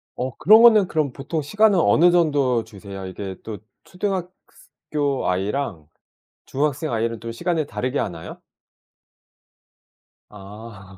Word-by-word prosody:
어 130 0 -4
그러면은 215 +1 +6
그럼 150 -5 -1
보통 155 +4 -4
시간은 205 +6 +3
어느 175 +1 +4
정도 145 -8 +2
주세요? 100 -3 -10
이게 95 +1 -7
또 105 -3 -7 0.2
초등학 185 -1 -3 0.2
스 - - -22 0.2
교 145 -3 0
아이랑 95 - -3 0.6
중학생 145 +1 -2
아이는 115 0 -2
또 115 0 -6
시간을 160 +5 -2
다르게 130 0 -3
하나요? 80 -1 -6 1.9
아. 100 -1 -12
130 Hz, 255 characters per minute, -22 LUFS, 105-165 Hz, 1.9 s, 그러면은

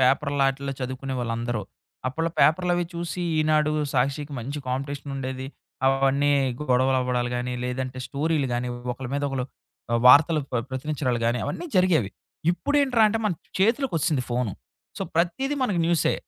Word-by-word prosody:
Paper 135 +3 +3
లాటిల్లో 135 0 +1
చదువుకునేవాళ్ళందరూ. 120 -3 -3 0.4
అప్పట్లో 165 +6 -1
పేపర్లవి 175 +2 +3
చూసి 170 +1 -3 0.2
ఈనాడు, 155 0 +3 0.2
సాక్షికి 140 +2 0
మంచి 140 +5 -4
కాంపిటీషనుండేది. 135 0 -4 0.4
అవన్నీ 135 +1 +3 0.4
గొడవలు 130 +1 +3
అవ్వడాలు 125 -1 0
గాని, 125 +1 -2
లేదంటే 130 +1 -3
స్టోరీలు 145 +1 0
గాని 125 +1 -1 0.2
ఒకళ్ళ 130 +1 -7
మీద 145 0 -1
ఒకళ్ళు, 135 -2 -2 0.5
ఆహ్, 115 - +2
వార్తలు 150 +4 +7
ప్ర 120 -2 0
ప్రచరించడాలు 130 -3 -1
గాని 120 +1 +1
అవన్నీ 350 - -4
జరిగేవి. 165 - +3 0.4
ఇప్పుడ 285 +11 -3
ఏంట్రా 245 -5 +4
అంటే, 225 +2 0
మన 200 - +1 0.3
చేతిలోకొచ్చేసింది 180 - +2
ఫోను. 120 -4 0 0.5
సో, - - -2
ప్రతీది 225 - +1
మనకు 200 -8 +1
న్యూసే. 170 -3 +2
140 Hz, 135 wpm, -25 LUFS, 125-165 Hz, 0.5 s, వార్తలు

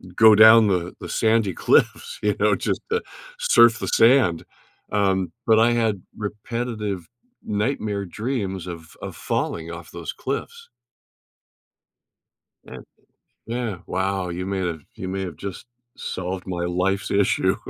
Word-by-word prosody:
go 110 0 +7
down 110 +1 +8
the 90 -3 -1
the - - -8
sandy 110 -3 +2
cliffs, 475 +1 +1
you - - +1
know, - - +3
just - - -2
to 455 +1 +1 0.4
surf 120 - +5
the - - -4
sand. 115 -8 +4 0.5
Um, 95 -3 +1 0.2
but 110 -1 +5
I 115 +1 +5
had 110 -5 0 0.2
repetitive 105 -3 -4 0.4
nightmare 105 -2 -2
dreams 100 -3 -4
of 85 -2 -9
of - - -7
falling 85 0 -3
off 85 -1 -9
those 85 -3 -6
cliffs. 465 - -5 2.0
Yeah. - - -10 0.7
Yeah, 115 -3 -3
wow. 95 0 -1
You 90 +2 -4
may 95 0 -2
have 85 -3 -3
you 95 - -6
may 95 +1 -3
have 90 -4 -6
just 100 +2 -7 0.3
solved 90 0 -5
my 85 -1 -3
life's 95 +3 -1
issue. 100 -1 +2
100 Hz, 135 wpm, -23 LUFS, 90-115 Hz, 2.0 s, down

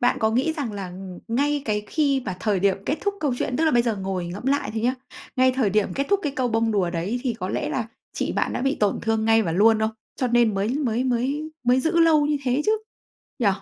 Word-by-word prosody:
bạn 245 +1 +2
có 220 0 +3
nghĩ 260 +7 +1
rằng 285 -8 -4
là 195 -2 -5
ng 185 0 -9
ngay 285 +4 +1
cái 210 -3 0
khi 280 -4 +1
mà 185 -3 -4
thời 205 -3 +1
điểm 195 0 +3
kết 290 - +1
thúc 405 -1 -1
câu 290 -4 +1
chuyện, 250 - -1
tức 325 - +2
là 315 - +4
bây 240 -3 +4
giờ 230 -3 -1
ngồi 190 -2 -3
ngẫm 190 +8 -7
lại 280 +1 +1
thôi 220 - -2
nhá, 250 +2 +2 0.4
ngay 255 0 +4
thời 250 -6 +1
điểm 210 +1 +1
kết 275 +1 -1
thúc 400 -1 +2
cái 290 - -1
câu 255 -1 +1
bông 225 0 +1
đùa 190 -4 +1
đấy 185 +8 -2
thì 250 -4 -1
có 185 -4 -5
lẽ - - -2
là 230 -4 -2 0.2
chị - - -2
bạn - - 0
đã - - -2
bị 270 +1 +1
tổn 205 -1 +2
thương 225 -1 0
ngay 225 0 +4
và 165 - -2
luôn 215 +5 +5
không? 220 0 +1 0.3
Cho 255 - 0
nên 240 -3 +3
mới 195 +2 0
mới 255 -3 0
mới 265 +5 -1
mới 250 +2 +4
giữ 330 +3 +1
lâu 315 -3 +5
như 295 0 +1
thế 260 +3 +1
chứ, 430 - +4 0.7
nhỉ? 240 - +1
240 Hz, 270 wpm, -24 LUFS, 210-275 Hz, 0.7 s, luôn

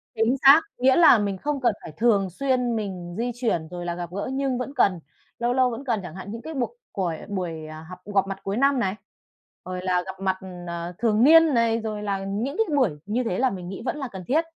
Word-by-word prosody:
Chính 225 +4 +2
xác, 285 +4 +9 0.2
nghĩa 260 +1 +4
là 325 -8 +7
mình 200 -2 -1
không 290 +6 -2
cần 235 -4 +3
phải 160 - -8
thường 210 -5 +3
xuyên 250 +3 0
mình 185 -5 -5
di 245 +1 -1
chuyển 215 -10 -1
rồi 175 0 -6
là 170 0 -2
gặp 175 -1 -5
gỡ 200 +6 -4
nhưng 270 -2 0
vẫn 255 +3 -4
cần, 185 -3 +3 0.4
lâu 240 +1 +1
lâu 255 -1 +3
vẫn 240 +3 -6
cần 230 -5 0
chẳng 175 -2 -8
hạn 190 +2 -7
những 230 +1 -6
cái 320 - -7
buộc 290 - -3
cuổi 175 -5 -2
buổi, 170 -5 -4
ờ, 155 0 -9
hập 180 0 -9
gọp 200 -2 +1
mặt 195 -1 -5
cuối 195 +2 -2
năm 275 +1 +3
này, 195 -3 0 0.7
rồi 180 0 -5
là 180 -1 +1
gặp 190 0 -8
mặt, 190 -1 0 0.3
ờ, 170 +1 -5
thường 225 0 +2
niên 325 0 +7
này, 230 -1 +2
rồi 215 -2 -4
là 195 -1 -2
những 220 +9 -3
cái 445 -10 +1
buổi 255 - +3
như 230 +5 -1
thế 225 -4 -2
là 260 0 +3
mình 180 -3 -6
nghĩ 195 - -7
vẫn 290 - -2
là 275 - -4
cần 190 -1 -7
thiết, 310 +5 +2
215 Hz, 245 wpm, -24 LUFS, 185-255 Hz, 0.7 s, xác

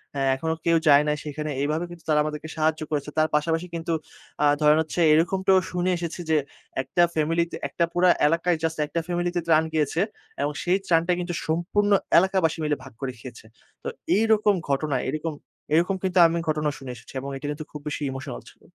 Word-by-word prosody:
হ্যাঁ, 135 -1 +1
এখনো 160 +4 -2
কেউ 165 -1 +4
যায় 145 0 +8
নাই 150 - +2
সেখানে।" 150 0 -4
এইভাবে 155 +4 0
কিন্তু 170 -2 -12
তারা 150 - +4
আমাদেরকে 155 +1 -5
সাহায্য 155 0 +1
করেছে। 150 -1 -2
তার 155 0 +4
পাশাপাশি 165 +3 0
কিন্তু 165 0 -3 0.5
আ - - +5 0.2
ধরেন 150 +1 +5
হচ্ছে, 160 +2 -4
এরকমটাও 190 +4 +3
শুনে 180 +1 0
এসেছি 170 0 -5
যে, 155 - +4 0.4
১ 130 - -12
টা 175 - +7
ফ্যামিলি 165 +2 +1
তে, - - -5
একটা 170 - 0
পুরা 180 +1 +4 0.2
এলাকায় 170 +2 +2
জাস্ট 160 0 -1
১ 145 - -16
টা 170 - +2
ফ্যামিলি 175 0 0
তে - - +2
ত্রাণ 160 -1 +5
গিয়েছে 155 +1 0 0.4
এবং 145 +1 0
সেই 180 +2 +2
ত্রাণটা 170 0 +2
কিন্তু, 175 0 -3
সম্পূর্ণ 175 +6 +1 0.3
এলাকাবাসী 185 -3 +3
মিলে 150 -1 +1
ভাগ 135 -3 -12
করে 135 - -2
খেয়েছে। 115 -2 -11 0.4
তো - - -5 0.3
এইরকম 215 -1 +3 0.2
ঘটনায় 140 -1 0
এরকম, 155 +1 -3 0.4
এরকম 175 +4 +3
কিন্তু 185 -1 -1
আমি 170 +1 -1
ঘটনা 150 -1 +1
শুনে 135 -2 -8
এসেছি 115 - -14
এবং 140 +1 -6
এটি 135 - -9
কিন্তু 150 +1 -6
খুব 150 - -8
বেশি 150 - -3
ইমোশনাল 130 - -6
ছিল। - - -28
160 Hz, 200 wpm, -25 LUFS, 150-175 Hz, 0.5 s, যায়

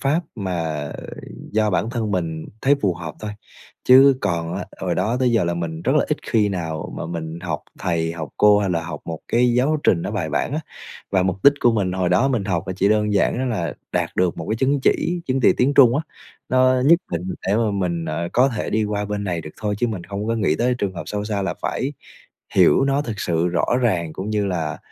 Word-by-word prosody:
pháp 145 +5 +1
mà 80 -8 -3 0.6
do 110 0 +2
bản 110 +4 0
thân 115 -3 -2
mình 80 -4 -2 0.2
thấy 140 +2 +5
phù 95 -3 +2
hợp 80 -2 -7
thôi. 105 -1 -4 0.6
Chứ 135 +1 +8
còn 85 -3 -1
á, 95 - -4 0.2
hồi 90 -2 -1
đó 115 +8 0
tới 125 -2 +3
giờ 115 -5 +3
là 85 0 -1
mình 85 -1 -4
rất - - +1
là - - +3
ít - - +1
khi 105 -2 +3
nào 80 -5 -4
mà - - -4
mình 80 -1 -5
học 80 -4 -3 0.2
thầy, 85 -2 -1
học 80 -3 -6
cô 105 0 +6
hay 100 -2 0
là 85 -2 0
học - - -6
một 80 -1 -5
cái 120 +1 +3
giáo 135 +6 +2
trình 85 - +3
nó - - -3
bài 100 -7 -2
bản - - -1
á. 155 - -1 0.5
Và 95 -2 +2
mục 95 +1 -2
đích 140 - +9
của 120 - +4
mình 100 -5 0
hồi 95 -1 0
đó 90 +10 +3
mình 120 -7 0
học 90 -3 -1
là 95 - -2
chỉ 100 +1 +2
đơn 105 0 +2
giản 100 - +2
đó 130 - -1
là 110 -10 -2 0.2
đạt - - 0
được 90 -2 +1
một 80 - -5
cái 110 - 0
chứng 135 +3 +1
chỉ, 175 +5 +1
chứng 130 0 0
chỉ - - +5
tiếng 140 +3 +2
Trung 125 -2 +6
á, 150 - 0 0.5
nó 130 0 +3
nhất 165 +3 +7
định 85 -1 -2 0.2
để 100 +3 +2
mà 115 -2 +1
mình, 90 -4 -1
ờ, 80 +2 -3
có 130 +3 +4
thể 115 -5 -3
đi 110 0 +1
qua 105 0 -2
bên 105 0 -3
này 85 -3 -2
được 75 - -9
thôi 105 -2 -1
chứ 120 - +1
mình 100 -7 -4
không 100 +1 -5
có 115 - 0
nghĩ 100 -9 +1
tới 125 +1 +1
trường 100 -4 -2
hợp 85 - -5
sâu 105 +1 -3
xa 105 -2 -2
là 95 -2 -2
phải 135 +3 -2 0.6
hiểu 135 - +5
nó 140 +1 +1
thực 110 -7 -5
sự 85 0 0
rõ 85 -1 +1 0.2
ràng 85 -9 0
cũng 100 +3 -5
như 105 -1 0
là 85 -5 -2
100 Hz, 250 wpm, -21 LUFS, 85-120 Hz, 0.6 s, đích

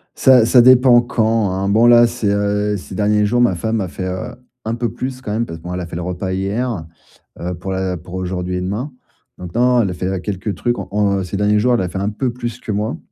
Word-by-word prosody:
Ça 125 -4 +5
ça 125 +1 +6
dépend 125 -1 +6
quand, 110 -4 0
hein, 95 +1 -1
bon 110 +3 +4
là 120 0 +7
c'est, 115 -3 -2
heu, 105 0 0
ces 95 0 -10
derniers 105 0 +2
jours 120 +4 +1
ma 120 -7 +3
femme 110 +4 -1
a 95 - -2
fait, 95 +2 -5
heu, 90 0 -5 0.3
un 110 - -1
peu 120 -2 -2
plus 130 +2 -5
quand 105 - -5
même 115 +2 -1
parce 80 -6 -8
que - - -20
bon, 90 +1 -5
elle 90 - -3
a 90 - -4
fait 85 - -9
le 90 - -3
repas 90 +1 -3
hier, 100 0 -2 0.5
heu, 90 +1 -3
pour 95 +3 -6
la 95 -1 -2
pour 90 +3 -10
aujourd'hui 90 0 -3
et 90 - -2
demain. 105 +10 -3 0.5
Donc 90 -1 -9
non, 125 0 +3
elle 100 - 0
a - - -3
fait 95 +1 -3
quelques 100 +1 -4
trucs 120 0 -1
en - - -6
en 100 -2 +1
ces 95 +2 -4
derniers 105 +1 +2
jours, 125 +2 +3
elle 115 - 0
a 90 - -2
fait 95 - -4
un 100 +2 -1
peu 120 +4 -2
plus 120 -1 -5
que 110 - -6
moi. 105 +3 -2
105 Hz, 265 wpm, -18 LUFS, 95-120 Hz, 0.5 s, là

